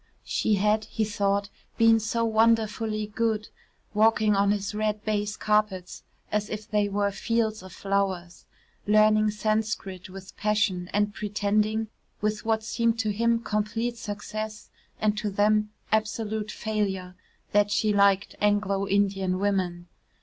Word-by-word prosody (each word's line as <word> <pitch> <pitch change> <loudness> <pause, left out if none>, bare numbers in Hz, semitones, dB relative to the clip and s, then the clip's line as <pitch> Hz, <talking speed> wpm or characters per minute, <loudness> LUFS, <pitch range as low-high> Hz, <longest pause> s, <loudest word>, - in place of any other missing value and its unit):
She 215 - +1
had, 210 +2 +2
he 220 - -1
thought, 200 -1 0 0.3
been 225 0 +6
so 230 +2 -1
wonderfully 220 -1 +2
good, 215 0 -1 0.4
walking 215 0 +4
on 200 0 +3
his 205 0 -1
red 215 0 -2
baize 210 -1 -1
carpets 210 -4 0 0.3
as 210 0 -1
if 215 0 -5
they 210 -1 +1
were 200 0 0
fields 220 +1 -1
of 185 0 -11
flowers, 190 -2 -2 0.4
learning 215 0 +5
Sanscrit 210 -3 -2
with 190 0 -11
passion 205 -4 0
and 205 0 +1
pretending, 210 +1 0 0.3
with 215 0 -1
what 220 -1 0
seemed 230 +1 0
to 220 -2 0
him 230 +2 +1
complete 225 +3 -1
success, 215 0 -6 0.3
and 215 -1 +2
to 215 -2 -2
them, 210 +1 +2 0.2
absolute 215 0 -1
failure, 200 -5 -2 0.4
that 205 0 +3
she 210 0 +1
liked 200 0 +3
Anglo 205 -1 +1
Indian 195 -2 +1
women. 185 -3 -1
210 Hz, 135 wpm, -26 LUFS, 200-215 Hz, 0.4 s, been